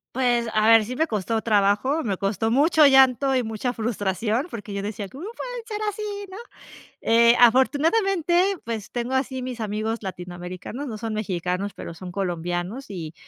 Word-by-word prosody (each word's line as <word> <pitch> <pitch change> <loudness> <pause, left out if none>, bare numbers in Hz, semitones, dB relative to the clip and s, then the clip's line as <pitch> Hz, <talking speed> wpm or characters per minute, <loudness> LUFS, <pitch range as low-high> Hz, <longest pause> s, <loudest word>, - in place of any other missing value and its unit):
Pues, 240 -2 +1
a 215 0 +3
ver, 225 -1 +7
sí 250 +4 -5
me 320 - +2
costó 220 - -2
trabajo, 210 +8 +2
me 200 -4 -2
costó 205 +3 -1
mucho 300 +5 +5
llanto 265 0 +5
y 255 - +1
mucha 225 +3 -3
frustración, 225 - -1
porque 215 -6 -7
yo 200 - -3
decía, 205 0 -5
cómo 280 - -9
pueden - - -6
ser 425 -2 -4
así, 420 +1 -7 0.3
¿no? 385 - -8 0.7
Eh, 235 +1 +5
afortunadamente, 340 - +3
pues, 225 -3 -5
tengo 245 +2 -2
así 260 -1 -1
mis 250 -2 -5
amigos 215 +1 -2
latinoamericanos, 180 +6 -7
no 225 -5 -5
son 225 0 -4
mexicanos, 190 -1 -2
pero - - -7
son 180 +1 -9
colombianos, 180 +6 -3
y 165 -5 -7
225 Hz, 165 wpm, -24 LUFS, 200-265 Hz, 0.7 s, ver